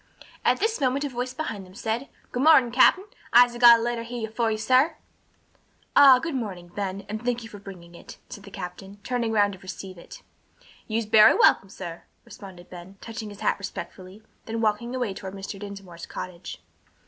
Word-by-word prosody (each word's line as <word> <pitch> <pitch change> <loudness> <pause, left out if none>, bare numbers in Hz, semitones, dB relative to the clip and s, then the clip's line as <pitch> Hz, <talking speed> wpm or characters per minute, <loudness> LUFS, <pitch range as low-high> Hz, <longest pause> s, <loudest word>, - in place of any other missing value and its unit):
At - - +2
this 440 -3 -1
moment 270 +2 +1
a - - -3
voice 250 0 -4
behind 220 -10 -5
them 185 0 -16
said, 225 +6 -3 0.2
"Good 250 - -2
mornin', 270 -5 +6
cap'n. 260 +9 +5 0.3
I'se 245 0 +6
got 240 -1 +9
a - - -3
lettah 240 -1 -2
hyah 230 -2 -5
for 230 0 0
you, 215 - -1
sah." 255 +8 +3 1.0
"Ah, 270 -2 +8
good 320 +5 -4
morning, 195 -9 -5
Ben, 195 +1 -5
and 215 +2 -6
thank 240 -1 -1
you 225 - -10
for 205 - -11
bringing 180 -4 -12
it," 170 - -12
said 210 -5 -10
the 200 - -11
captain, 195 +1 -9
turning 240 -3 -2
round 205 -2 +2
to 190 - -11
receive 185 -1 -9
it. - - -13 0.6
"You's 225 0 -1
bery 215 0 +6
welcom, 195 - +4
sah," 175 -4 -8 0.3
responded 185 -3 -12
Ben, 180 +2 -11
touching 225 -1 -7
his 205 - -12
hat - - 0
respectfully, 190 +1 -8 0.2
then 225 0 -3
walking 225 +3 -1
away 245 -6 -2
toward 190 0 -8
Mr. 195 0 -7
Dinsmore's 195 -4 -9
cottage. 180 -1 -8
215 Hz, 190 wpm, -25 LUFS, 195-245 Hz, 1.0 s, got